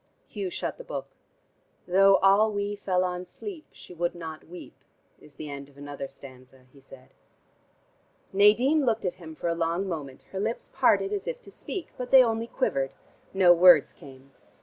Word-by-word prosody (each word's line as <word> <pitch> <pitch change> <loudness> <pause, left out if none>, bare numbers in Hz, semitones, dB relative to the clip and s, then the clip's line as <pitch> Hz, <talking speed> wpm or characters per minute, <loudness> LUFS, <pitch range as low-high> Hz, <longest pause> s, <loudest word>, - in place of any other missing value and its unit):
Hugh 200 -3 -5
shut - - -5
the - - -8
book. - - -6 0.8
"'Though 195 +2 +5
all 200 +3 +5
we 205 0 -2
fell 185 -2 0
on 180 0 -3
sleep, 335 - -9
she - - -14
would 175 0 -2
not 160 -2 -8
weep,' 175 +2 -12 0.4
is 145 - -17
the 155 - -8
end 140 0 -8
of 140 - -23
another 145 -1 -7
stanza," 130 -1 -16
he 140 - -17
said. 135 -1 -17 1.2
Nadine 240 +10 +4
looked 225 -5 0
at 180 - -1
him 160 -1 -10
for 170 - -4
a 170 - +1
long 170 +3 -1
moment, 145 -7 -6
her 190 - -4
lips 220 +4 -3
parted 395 +1 +2
as 405 - -4
if - - -4
to - - -14
speak, 375 - -6
but 250 0 -4
they 265 -1 +8
only 225 -1 -1
quivered; 135 - -1 0.4
no 185 -2 +6
words 175 -3 +6
came. 135 0 -15
180 Hz, 180 wpm, -27 LUFS, 145-215 Hz, 1.2 s, they